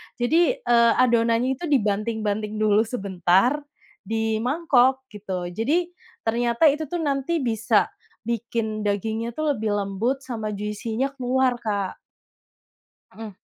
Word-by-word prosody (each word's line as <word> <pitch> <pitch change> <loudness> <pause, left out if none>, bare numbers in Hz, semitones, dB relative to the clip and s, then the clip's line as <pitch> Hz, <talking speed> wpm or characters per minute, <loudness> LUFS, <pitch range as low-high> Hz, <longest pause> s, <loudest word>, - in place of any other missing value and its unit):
Jadi, 295 +5 +2
eee, 235 -1 +5
adonannya 240 +1 +2
itu 345 - -4
dibanting-banting 215 -3 0
dulu 215 +1 +2
sebentar, 195 - +1 0.5
di 220 -1 0
mangkok 265 -1 +2
gitu. 185 -4 -5
Jadi, 315 - 0 0.3
ternyata 235 +5 +3
itu 305 +1 -4
tuh 340 +1 -3
nanti 280 +2 -1
bisa 225 -2 +1 0.4
bikin 225 -2 -2
dagingnya 220 +3 -1
tuh 305 -1 0
lebih 215 -1 -1
lembut 205 +7 -1
sama 220 -5 -4
juicy-nya 220 +6 -3
keluar 255 0 +1
Kak. 205 -4 -2 1.1
Hmm. 225 -1 -8
230 Hz, 115 wpm, -24 LUFS, 215-260 Hz, 1.1 s, eee